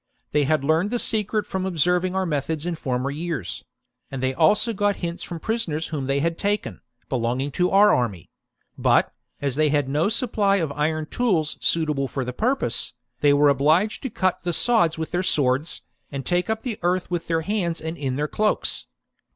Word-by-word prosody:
They 150 -1 +2
had 155 0 +1
learned 160 +7 +2
the 245 - 0
secret 215 -2 +1
from 190 -1 -3
observing 180 +1 +1
our 190 0 +1
methods 155 0 -2
in 175 - -1
former 130 -4 -2
years; 150 - -4 0.5
and 135 - -5
they 130 0 +1
also 200 - +3
got 205 -1 +1
hints 170 -1 -5
from 170 - -6
prisoners 165 -7 -2
whom 145 -4 -3
they 135 +1 +1
had 165 +1 -1
taken, 205 +1 -2 0.3
belonging 130 +3 -1
to 180 +5 +1
our 205 +2 +6
army: 105 -9 -1 0.5
but, - - +3 0.3
as 140 -2 0
they 155 +1 +3
had 145 -2 +1
no 150 +7 +1
supply 215 -4 +1
of 165 -7 0
iron 155 +2 -1
tools 170 -6 0
suitable 150 -4 +1
for 130 -1 -3
the 125 - -4
pur 250 - +1
pose, - - -2 0.3
they 145 - +4
were 145 0 +5
obliged 155 +10 +2
to 265 - -3
cut 185 -4 0
the 175 -1 -2
sods 170 -7 +3
with 160 0 -4
their 180 +1 0
swords, 145 -3 +1 0.3
and 140 -1 -5
take 180 +3 0
up 220 0 -1
the 240 -5 -4
earth 180 +1 0
with 175 -2 -2
their 165 -1 +1
hands 175 -2 -1
and 160 +1 -5
in 135 -5 -3
their 150 +2 -1
cloaks. 215 +6 0
165 Hz, 195 wpm, -23 LUFS, 145-190 Hz, 0.5 s, our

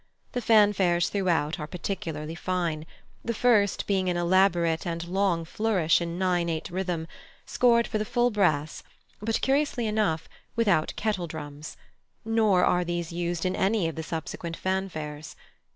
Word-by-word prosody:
The 245 - -2
fanfares 205 -6 +4
throughout 170 -6 0
are 150 - -4
particularly 165 -3 -4
fine, 170 -3 -2 0.4
the 235 - -2
first 210 -4 +3
being 190 -2 +1
an 175 - 0
elaborate 175 -2 +2
and 170 0 -3
long 180 -2 +1
flourish 185 -4 +1
in 170 0 -3
nine 180 -2 +1
eight 160 0 -3
rhythm, 175 -3 -2 0.4
scored 235 -1 +3
for 215 - -2
the - - 0
full 240 +3 +1
brass, 155 -8 +1 0.4
but, 225 +1 0
curiously 270 -3 +1
enough, 210 -7 0 0.3
without 200 -9 +2
kettledrums; 160 -8 -4 0.5
nor 220 -5 +3
are 180 0 +2
these 175 -1 -3
used 175 0 -2
in 185 0 0
any 195 -2 +1
of 165 - -3
the 160 - -5
subsequent 165 +1 -5
fanfares. 160 -5 -4
180 Hz, 145 wpm, -27 LUFS, 165-205 Hz, 0.5 s, fanfares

